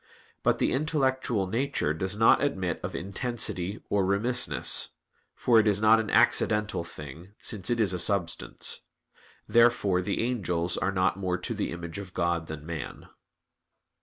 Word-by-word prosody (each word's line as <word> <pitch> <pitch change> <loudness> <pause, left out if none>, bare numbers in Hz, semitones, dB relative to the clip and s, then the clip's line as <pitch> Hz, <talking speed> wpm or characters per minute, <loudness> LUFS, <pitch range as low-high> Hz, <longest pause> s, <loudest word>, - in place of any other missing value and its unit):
But - - +2
the - - +1
intellectual 130 -7 0
nature 110 - -1
does 95 +5 -3
not 115 +5 +4
admit 95 - -1
of - - -5
intensity 100 0 -3
or 100 -1 +1
remissness; 110 +6 +1 0.4
for 120 -2 +4
it 110 - +2
is 105 -1 +2
not 110 +1 +5
an 110 -2 -3
accidental 105 -4 +2
thing, 85 +3 -11
since 100 -5 -1
it 120 -1 0
is 100 -5 +2
a 90 - -2
substance. 85 -1 0 0.7
Therefore 115 -6 +3
the 100 +4 -2
angels 90 -8 -1
are 95 - -1
not 95 0 +1
more 90 -2 -1
to 90 - -4
the - - -3
image 85 +1 -6
of 95 -2 -10
God 85 -1 -1
than 75 -1 -8
man. 80 -5 -7
100 Hz, 155 wpm, -27 LUFS, 85-115 Hz, 0.7 s, not